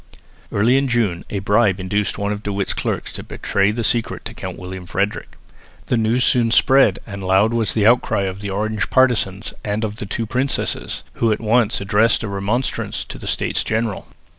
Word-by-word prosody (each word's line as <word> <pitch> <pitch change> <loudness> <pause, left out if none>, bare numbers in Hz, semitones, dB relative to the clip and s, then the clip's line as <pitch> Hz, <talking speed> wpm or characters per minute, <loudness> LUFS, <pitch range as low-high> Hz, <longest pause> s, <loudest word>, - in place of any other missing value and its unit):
Early 115 +6 +3
in 135 - 0
June 110 -8 0
a 105 - -3
bribe 100 0 +2
induced 100 +2 -1
one 100 0 -1
of 105 0 -4
De 105 - -3
Witt's 100 0 -1
clerks - - -3
to - - -6
betray 100 0 0
the 115 +2 -2
secret 115 +1 -1
to - - -6
Count - - -7
William 90 0 -8
Frederick. 100 +3 -2 0.5
The - - 0
news 115 +2 +2
soon 120 -1 +3
spread, 125 -3 +5
and 100 -2 -7
loud 95 +4 +3
was 115 -4 0
the 105 -2 +2
outcry 115 -3 +3
of 95 0 -3
the 100 - -4
Orange 105 +1 -2
partisans 110 -6 +1
and 105 +1 -2
of 105 -1 -3
the 105 - -5
two 115 - -2
princesses, 130 +4 -2 0.2
who 115 - +3
at 105 - 0
once 115 0 +2
addressed 105 +3 +2
a - - -3
remonstrance 100 +6 -2
to - - -9
the - - -8
States - - +1
General. 110 -2 -2
105 Hz, 195 wpm, -20 LUFS, 100-115 Hz, 0.5 s, spread